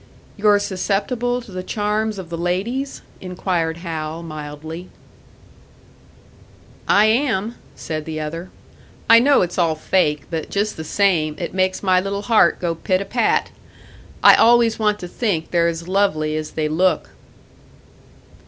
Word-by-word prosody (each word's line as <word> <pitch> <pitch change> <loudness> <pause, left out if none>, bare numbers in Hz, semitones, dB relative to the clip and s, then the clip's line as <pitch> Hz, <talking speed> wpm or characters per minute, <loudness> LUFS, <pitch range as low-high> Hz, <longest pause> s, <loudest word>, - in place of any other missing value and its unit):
"You're 210 0 +4
susceptible 210 +6 -1
to 225 - -14
the 185 0 -5
charms 210 +2 -2
of 180 -3 -8
the 170 - -3
ladies?" 210 +11 -2 0.2
inquired 180 -3 -2
Hal, 160 0 -4
mildly. 155 +2 -8 2.0
"I 205 +1 +5
am," 225 -2 +1 0.2
said 155 -1 -5
the 155 -1 -5
other. 165 +4 -5 0.6
"I 230 0 +8
know 275 0 +4
it's 175 +1 -3
all 165 -2 +2
fake, 150 -3 +1
but 160 -2 -4
just 205 +1 -1
the 160 - -6
same, 160 -4 +1
it 170 - -5
makes 185 +1 0
my 185 -2 +4
little 200 +1 -4
heart 215 -6 +3
go 170 -2 -1
pit 185 +3 0
a 200 - -4
pat. - - 0 0.7
I - - +9
always 235 -1 +4
want 210 -1 +1
to 180 - -5
think 175 -5 -2
they're 170 -1 +3
as 165 0 -4
lovely 180 -6 +1
as 155 0 -3
they 155 -1 -2
look." 165 +2 +1
185 Hz, 145 wpm, -20 LUFS, 160-210 Hz, 2.0 s, I